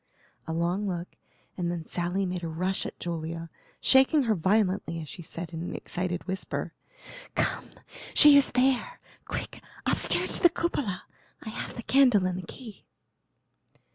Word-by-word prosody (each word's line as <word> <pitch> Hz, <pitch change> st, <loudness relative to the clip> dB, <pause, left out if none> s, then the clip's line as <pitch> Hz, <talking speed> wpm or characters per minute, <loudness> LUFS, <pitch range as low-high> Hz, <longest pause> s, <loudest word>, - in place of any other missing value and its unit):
A -, -, -3 dB
long 175 Hz, +5 st, -1 dB
look, 175 Hz, -2 st, -4 dB, 0.5 s
and 175 Hz, -2 st, -2 dB
then 170 Hz, -2 st, -5 dB
Sally 180 Hz, +4 st, -1 dB
made 180 Hz, -1 st, -4 dB
a -, -, -2 dB
rush 180 Hz, +4 st, -2 dB
at -, -, -10 dB
Julia, 165 Hz, -1 st, -5 dB, 0.3 s
shaking 270 Hz, +3 st, +4 dB
her 225 Hz, -3 st, +2 dB
violently 190 Hz, -2 st, +1 dB
as 155 Hz, -, -7 dB
she 175 Hz, -, -8 dB
said 170 Hz, 0 st, -7 dB
in 165 Hz, -, -5 dB
an 175 Hz, -, -5 dB
excited 180 Hz, -1 st, -3 dB
whisper: 190 Hz, +1 st, -4 dB, 0.6 s
"Come! -, -, -1 dB, 0.5 s
she 295 Hz, -1 st, +9 dB
is 280 Hz, -, +5 dB
there. 260 Hz, -, +1 dB, 0.3 s
Quick! -, -, -5 dB, 0.2 s
upstairs -, -, +4 dB
to -, -, -7 dB
the 345 Hz, -, +7 dB
cupola; 290 Hz, -, -2 dB, 0.4 s
I -, -, -6 dB
have 220 Hz, -, -5 dB
the 235 Hz, -, -7 dB
candle 250 Hz, -8 st, +4 dB
and 185 Hz, 0 st, -1 dB
the 180 Hz, -, -9 dB
key." 225 Hz, -6 st, -11 dB
185 Hz, 160 wpm, -27 LUFS, 170-235 Hz, 0.6 s, she